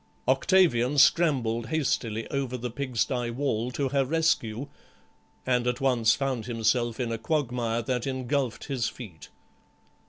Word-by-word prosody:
Octavian 145 -9 +3
scrambled 125 -8 +3
hastily 115 -6 -1
over 135 -3 -2
the 125 0 -5
pigsty 125 -1 -1
wall 120 -2 -1
to 135 +2 -2
her 140 0 +2
rescue, 140 -5 0 0.8
and 125 -1 +1
at 125 0 0
once 120 -4 +3
found 130 -4 -2
himself 115 0 0
in 120 -2 -1
a 115 - -3
quagmire 120 -4 -1
that 125 0 -2
engulfed 130 -1 -2
his 130 -6 -2
feet. 90 - -11
125 Hz, 130 wpm, -27 LUFS, 115-140 Hz, 0.8 s, Octavian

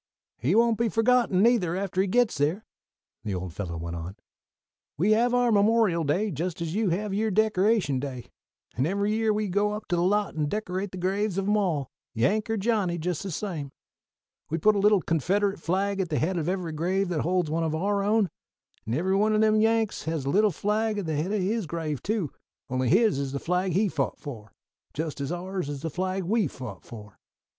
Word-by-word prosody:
"He 140 - +1
won't 230 0 +3
be 235 -1 +2
forgotten, 225 -4 +3
neither, 220 -8 +3
after 190 -1 -1
he 195 - 0
gits 240 0 +2
there," 160 +9 0 0.6
the 100 -3 -2
old 90 -1 -5
fellow 85 -3 -5
went 85 +1 -5
on. 85 +3 -6 0.8
"We 190 +8 +2
have 235 +3 +3
our 245 -1 +3
Memorial 205 -4 +3
Day, 185 +9 0
just 170 +4 -3
as 165 -1 -3
you 215 0 +1
have 195 +4 -1
your 220 +2 +1
Decoration 210 - +2
Day, 130 -3 -5 0.5
and 130 +4 +1
every 200 +3 0
year 220 0 +2
we 210 0 0
go 205 +3 +1
up 210 0 -6
to 175 - +2
the 170 - +1
lot 205 +3 +1
and 150 -2 -1
decorate 195 -1 -3
the 185 - -7
graves 195 +2 -1
of 195 0 -1
'em 210 - +3
all, 165 -10 0 0.2
Yank 205 - +1
or 225 - 0
Johnny, 200 -5 0
just 170 0 -2
the 195 - -5
same. 165 -5 -4 0.8
We 165 - -1
put 215 +6 +4
a - - +1
little 205 -2 +4
Confederate 195 +5 0
flag 195 +4 -1
at 185 -3 -1
the 150 - 0
head 180 +5 0
of 165 -1 -1
every 180 -3 -2
grave 180 +5 0
that 170 -4 -1
holds 175 -2 0
one 165 +1 0
of 160 -1 -1
our 200 +4 0
own; 205 -3 +2 0.6
and 115 - 0
every 185 +5 +1
one 215 +2 +3
o' - - +3
them 215 0 +4
Yanks 225 -1 +1
has 160 -4 -2
a 140 - 0
little 210 +4 +4
flag 210 +4 -1
at 200 - -2
the 160 -1 -2
head 160 +7 -1
of 210 -2 0
his 210 -1 -1
grave 155 -4 -3
too, 200 - -1 0.4
only 130 -1 0
his 210 -5 +4
is 140 -1 -3
the 140 - -2
flag 180 +2 0
he 205 +5 +3
fought 155 -7 -2
for, 110 -7 -9 0.4
just 155 -2 -3
as 140 - -3
ours 180 -2 -3
is 145 0 -6
the 165 - -3
flag 185 +2 -2
we 210 +1 +1
fought 125 -8 -8
for. 105 -3 -12
185 Hz, 220 wpm, -27 LUFS, 155-210 Hz, 0.8 s, put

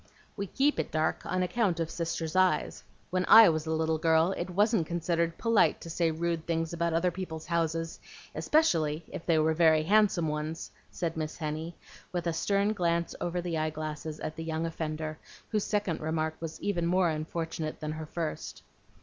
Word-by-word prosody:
"We 200 -1 -3
keep 285 +9 +1
it - - -1
dark 155 0 -1
on 185 0 0
account 180 -2 0
of 165 -1 -2
Sister's 165 -1 -3
eyes. 185 -5 +2 0.3
When 185 0 +1
I 225 -3 +10
was 155 -1 -1
a - - -1
little 160 0 +1
girl, 160 +2 +3
it 180 -1 -3
wasn't 205 -2 +2
considered 170 -1 -1
polite 230 -2 +3
to 165 - -7
say 170 0 +1
rude 165 0 -2
things 165 0 -1
about 170 -1 0
other 175 +2 +2
people's 165 -3 -6
houses, 165 -1 -1 0.3
especially 165 - +2
if - - -7
they 165 -2 +4
were 155 +1 +3
very 160 -1 +4
handsome 195 -2 +3
ones," 150 +2 -4 0.2
said 165 -2 -3
Miss 155 -1 -3
Henny, 160 +1 -4 0.4
with 175 -1 -2
a 170 - 0
stern 200 +5 +1
glance 170 -3 0
over 175 +1 -1
the 170 -2 -2
eye 155 0 0
glasses 155 0 -5
at 155 0 -4
the 165 - -5
young 160 0 -2
offender, 155 -1 -4 0.3
whose 210 -2 0
second 205 -6 -1
remark 160 0 -1
was 165 -1 -6
even 175 -4 0
more 180 0 +3
unfortunate 160 0 -3
than 155 -1 -3
her 155 0 -6
first. 165 0 -5
165 Hz, 185 wpm, -29 LUFS, 160-175 Hz, 0.4 s, I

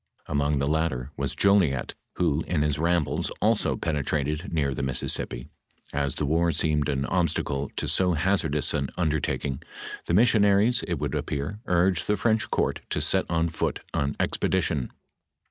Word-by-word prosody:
Among 75 0 0
the 70 - 0
latter 75 -4 -1
was 70 -1 -3
Jolliet, 95 -10 +2 0.2
who 80 -3 +1
in 80 -4 +1
his 75 -1 0
rambles 85 -1 +1
also - - +2
penetrated 75 +2 -2
near 70 -4 0
the 65 - -4
Mississippi.f 65 -1 -1 0.5
As 70 -2 0
the 75 - -1
war 85 +3 +2
seemed 75 -1 +1
an 70 -1 0
obstacle 75 -6 -1
to - - -2
so 90 -1 +2
hazardous 80 -4 +1
an 70 -2 -1
undertaking, 75 -4 -1 0.5
the 85 - +2
missionaries, 105 +1 +4
■ - - -11
it 85 -3 -1
would 75 0 -3
appear, 75 +9 -3
urged 90 0 +2
the 105 - +2
French 110 +2 +1
court - - 0
to - - -1
set - - +1
on 85 0 +1
foot 80 - -2
an 70 0 -1
ex - - 0
pedition. 80 -7 0
80 Hz, 160 wpm, -26 LUFS, 70-90 Hz, 0.5 s, missionaries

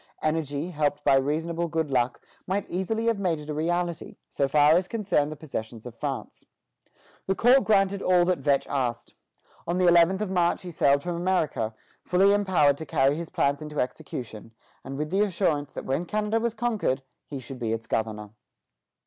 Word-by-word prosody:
Energy, 155 +1 -1
helped 145 -2 -1
by - - +4
reasonable 160 +5 0
good 160 -3 -2
luck, 125 -1 +1 0.3
might 200 +2 -1
easily 220 +5 -2
have 230 -3 +1
made 180 -5 0
it 150 0 -7
a - - -2
reality, 170 +2 -2
so 140 - 0
far 145 +2 +5
as 180 +2 +2
concerned 190 -10 0
the - - -5
possessions 115 -7 -7
of 125 - -8
France. 135 +2 -5 0.8
The 190 - +1
court 250 +5 +5
granted 200 -2 +2
all 180 -2 +4
that 180 -2 +1
Vetch 140 0 +1
asked. 120 -4 -3 0.5
On 170 +2 0
the 185 - +2
eleventh 175 +2 +5
of 210 -3 -3
March 175 -1 +1
he 180 - -7
sailed 140 -3 +2
for 175 - -3
America, 170 -11 -1 0.3
fully 195 +3 +4
empowered 185 -9 +3
to 160 - -5
carry 140 -2 +2
his 165 +1 -5
plans 140 +2 0
into 150 -1 -5
execution, 115 -3 -5 0.3
and 135 +1 -6
with 150 +2 -3
the 195 +2 +2
assurance 170 -8 0
that - - -6
when 145 +7 -1
Canada 215 +2 0
was 230 0 -2
conquered, 215 - -1 0.2
he 140 - -6
should 130 +1 -9
be 115 -3 -2
its 115 0 -3
governor. 105 -2 -3
160 Hz, 185 wpm, -26 LUFS, 140-185 Hz, 0.8 s, far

